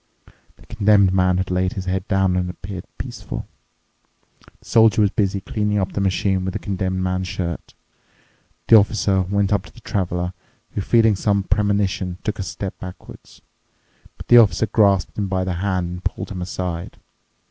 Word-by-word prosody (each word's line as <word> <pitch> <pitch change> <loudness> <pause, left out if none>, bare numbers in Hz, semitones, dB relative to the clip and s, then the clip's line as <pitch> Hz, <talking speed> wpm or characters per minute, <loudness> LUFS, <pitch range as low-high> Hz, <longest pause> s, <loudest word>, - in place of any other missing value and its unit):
The - - -20
Condemned 100 -3 +3
Man 90 -1 +3
had 95 0 -2
laid 90 0 0
his 95 -2 -5
head 95 +1 -2
down 95 -2 +2
and 90 -1 -1
appeared 90 0 -7
peaceful. - - -6 1.1
The - - -25
Soldier 110 -2 +4
was 100 - +2
busy 100 -1 0
cleaning 105 +1 -1
up 95 -1 -1
the 100 - -2
machine 95 0 +1
with 95 0 -3
the - - -3
Condemned 95 -2 -2
Man's 90 0 -1
shirt. 85 -2 -5 0.9
The 115 - +9
Officer 100 -2 +2
went 100 +2 0
up 100 -2 0
to - - -14
the - - -16
Traveler, 90 -3 -2 0.4
who, 100 - -3
feeling 110 0 +4
some 100 +1 +1
premonition, 100 -3 0
took 105 -1 -3
a - - -1
step 95 0 -6
backwards. 90 0 -11 0.7
But - - -11
the 120 - +8
Officer 110 0 +4
grasped 100 -3 +2
him 100 - -1
by 95 -1 -1
the 90 0 -2
hand 95 -3 -1
and 90 +1 -7
pulled 95 - -4
him 90 -2 -5
aside. 90 -2 -4
95 Hz, 175 wpm, -21 LUFS, 90-100 Hz, 1.1 s, The